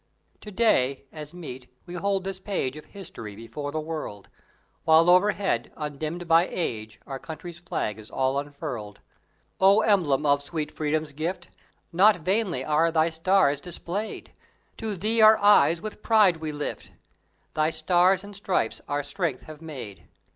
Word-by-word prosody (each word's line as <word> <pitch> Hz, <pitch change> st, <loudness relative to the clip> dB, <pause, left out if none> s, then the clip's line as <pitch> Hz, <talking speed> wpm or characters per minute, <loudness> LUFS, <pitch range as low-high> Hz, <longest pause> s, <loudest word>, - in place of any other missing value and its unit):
To 210 Hz, -, -10 dB
day, 140 Hz, -, +2 dB
as 150 Hz, -2 st, -8 dB
meet, 130 Hz, -8 st, -9 dB, 0.2 s
we 175 Hz, -, -9 dB
hold 195 Hz, +2 st, -1 dB
this 190 Hz, 0 st, -5 dB
page 185 Hz, -9 st, -2 dB
Of 155 Hz, -, -10 dB
History 115 Hz, -, -9 dB
before 115 Hz, +7 st, -6 dB
the 155 Hz, -, -2 dB
world; 155 Hz, -10 st, -6 dB, 0.5 s
While 165 Hz, +2 st, +6 dB
overhead, 185 Hz, -, +2 dB
undimmed 155 Hz, +3 st, -4 dB
by 165 Hz, +2 st, +5 dB
age 110 Hz, -, -4 dB
Our 135 Hz, -1 st, -6 dB
country's 170 Hz, +3 st, -8 dB
flag 110 Hz, -10 st, -3 dB
is 110 Hz, -, -12 dB
all 135 Hz, +1 st, 0 dB
unfurled! 125 Hz, -8 st, -6 dB, 0.6 s
O 195 Hz, +3 st, +6 dB
emblem 165 Hz, -10 st, +2 dB
of 145 Hz, -1 st, +3 dB
sweet 150 Hz, 0 st, -4 dB
Freedom's 155 Hz, 0 st, -2 dB
gift, 170 Hz, +4 st, -4 dB, 0.4 s
Not 200 Hz, +5 st, +6 dB
vainly 180 Hz, -, 0 dB
are 155 Hz, +2 st, +2 dB
thy 160 Hz, 0 st, +3 dB
stars 165 Hz, -3 st, +2 dB
displayed! 180 Hz, +5 st, -5 dB, 0.5 s
To 220 Hz, -3 st, -3 dB
thee 220 Hz, +5 st, +1 dB
our 215 Hz, 0 st, +8 dB
eyes 205 Hz, -5 st, +5 dB
with 215 Hz, 0 st, -7 dB
pride 210 Hz, -7 st, +4 dB
we 160 Hz, -1 st, -4 dB
lift; 145 Hz, 0 st, -5 dB, 0.6 s
Thy 155 Hz, 0 st, +2 dB
Stars 180 Hz, +4 st, +2 dB
and 205 Hz, 0 st, -11 dB
Stripes 190 Hz, -, -1 dB
our 145 Hz, 0 st, -1 dB
strength 150 Hz, -2 st, -3 dB
have 155 Hz, 0 st, -11 dB
made. 130 Hz, -11 st, -9 dB
160 Hz, 155 wpm, -26 LUFS, 145-190 Hz, 0.6 s, our